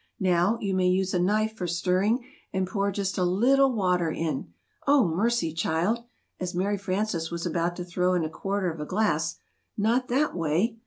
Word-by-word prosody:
"Now, 185 +3 +2
you 195 -2 -2
may 185 -1 +2
use 185 +1 +1
a 180 - +2
knife 215 +4 +1
for 180 -4 -3
stirring 185 +8 +1 0.3
and 190 0 0
pour 200 +1 -1
just 195 -1 -2
a - - +2
little 255 +10 +4
water 180 -6 +1
in 155 -3 -3 0.4
oh, 275 -7 +5
mercy! 180 0 0
child! 170 +8 0 0.3
(as 180 -1 -4
Mary 200 +3 0
Frances 185 -3 -1
was 170 0 -4
about 170 0 -1
to 180 - -5
throw 180 +1 +1
in 175 - +1
a - - -3
quarter 195 -1 -2
of 160 - -9
a 150 - -3
glass) 215 +3 0 0.4
not 235 +5 +1
that 275 +1 +1
way! 175 +8 0
185 Hz, 190 wpm, -27 LUFS, 175-215 Hz, 0.4 s, oh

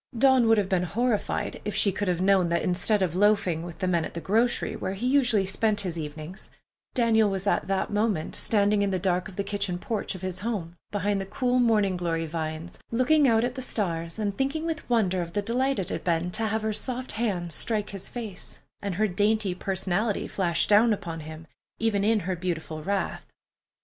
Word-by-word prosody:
Dawn 260 -1 +5
would 225 0 +5
have 200 -2 +1
been 190 -2 +1
horrified 225 +5 -1
if 210 -1 -3
she 210 -1 +4
could 205 +2 -3
have 180 0 0
known 190 -3 +4
that 170 0 +1
instead 190 +3 +1
of 175 -4 -1
loafing 195 -4 +3
with 170 -1 -8
the 185 - -1
men 170 -3 +2
at - - -7
the - - -2
grocery, 225 +7 +1
where 190 - -3
he 205 - -4
usually 250 -7 +3
spent 205 +2 +1
his 180 -4 -4
evenings, 155 +4 -7 0.5
Daniel 225 -4 +4
was 195 0 -3
at 200 - +1
that 195 +1 -1
moment 205 -6 0
standing 205 -1 +2
in 200 - +2
the 190 - 0
dark 180 0 0
of 195 - -11
the 200 - -1
kitchen 200 -2 -2
porch 205 +1 -3
of 185 - -10
his 185 0 -3
home, 190 -6 -3
behind 205 0 0
the - - -4
cool 250 +4 +1
morning 210 -6 +3
glory 165 -2 -1
vines, 160 +1 -5
looking 270 +5 +3
out 225 -2 +4
at 245 +1 -1
the 260 - -6
stars 170 -8 -1
and 205 -2 -1
thinking 275 +6 -1
with 320 -5 -4
wonder 190 -6 +2
of 170 -1 -6
the 205 - 0
delight 255 +5 0
it 190 - -2
had - - -4
been 170 0 0
to 220 +3 0
have 220 +1 -1
her 220 0 0
soft 255 +3 -3
hands 185 -7 -2
strike 210 +4 0
his 195 -2 -5
face, 220 -6 -7 0.2
and 200 -3 -3
her 215 +3 +2
dainty 205 +1 +1
personality 190 +3 -1
flash 175 -4 +1
down 215 +2 +5
upon 170 -5 -5
him, 155 +1 -9 0.3
even 220 -3 +1
in 215 0 +3
her 185 +1 -2
beautiful 165 -3 -4
wrath. 200 +2 -2
200 Hz, 210 wpm, -26 LUFS, 180-220 Hz, 0.5 s, Dawn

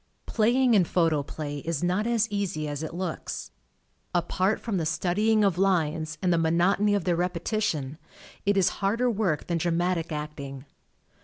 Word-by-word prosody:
Playing 245 +3 +3
in 200 -4 +6
Photoplay 155 -3 -1
is 165 +1 -3
not 185 +5 +1
as 230 -2 +2
easy 190 -7 -2
as 145 0 -4
it 160 +1 -5
looks. 180 -2 -4 0.6
Apart 185 +4 +1
from 220 -5 -2
the 165 - -1
studying 210 +7 +2
of 190 -3 +2
lines 160 -5 +1
and 180 -1 +3
the 170 - +2
monotony 180 +6 +3
of 200 - 0
their 175 0 +1
repetition, 170 -4 -1 0.4
it 200 0 +2
is 190 - +4
harder 230 +5 +2
work 195 -8 0
than 170 -1 -1
dramatic 170 0 0
acting. 145 -3 -6
175 Hz, 155 wpm, -27 LUFS, 160-205 Hz, 0.6 s, in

